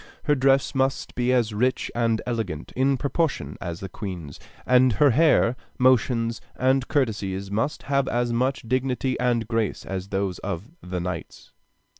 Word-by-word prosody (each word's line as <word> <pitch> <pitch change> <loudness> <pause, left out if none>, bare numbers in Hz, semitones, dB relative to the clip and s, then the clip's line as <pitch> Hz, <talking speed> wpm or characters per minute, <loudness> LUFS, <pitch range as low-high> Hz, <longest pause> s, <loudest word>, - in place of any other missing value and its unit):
Her 150 - +3
dress 135 -1 +3
must 135 0 0
be 125 +1 +1
as 120 -4 +2
rich 125 +5 0
and 115 -1 +1
elegant, 110 -11 -3
in 135 +1 +2
proportion, 140 - -1
as 85 -1 -5
the 95 - -4
Queen's, 90 -7 -7 0.3
and 125 -1 +5
her 140 +7 +4
hair, 140 -3 +4 0.2
motions, 120 -3 +2
and 130 +1 +2
curtsies 100 -8 -1
must 115 +8 -1
have 140 -1 +1
as 120 0 0
much 130 +3 0
dignity 130 +2 0
and 120 -3 +1
grace 115 -2 -1
as 95 0 -4
those 95 -2 -2
of 95 - -5
the 90 0 -4
knights. 85 -1 -6
120 Hz, 155 wpm, -25 LUFS, 100-130 Hz, 0.3 s, and